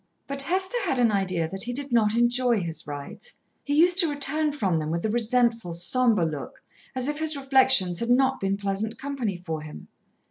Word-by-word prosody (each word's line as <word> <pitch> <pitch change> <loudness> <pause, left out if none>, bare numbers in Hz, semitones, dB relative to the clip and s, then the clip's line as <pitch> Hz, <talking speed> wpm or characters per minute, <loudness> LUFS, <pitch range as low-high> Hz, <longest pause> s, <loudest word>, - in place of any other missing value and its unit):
But 275 0 -4
Hester 375 - -1
had 330 -9 -1
an 240 -3 +3
idea 185 -5 0
that 195 +3 -6
he 245 +3 -2
did 280 +1 -5
not 220 -2 +2
enjoy 240 -1 +2
his 165 -3 -4
rides. 145 - -8 0.3
He 285 - -1
used 350 +4 +4
to 335 -4 +4
return 295 +1 0
from 195 - 0
them 155 0 -3
with 170 +3 -2
a 215 - 0
resentful, 230 -4 0
sombre 215 +2 +3
look, 150 -4 -6 0.3
as 255 0 -2
if 295 +1 -3
his 315 -1 -1
reflections 265 -10 +3
had 235 - -3
not 265 +2 +3
been 195 0 -1
pleasant 205 +3 -3
company 260 -9 -3
for 165 -3 -5
him. 150 - -11
235 Hz, 200 wpm, -25 LUFS, 185-275 Hz, 0.3 s, used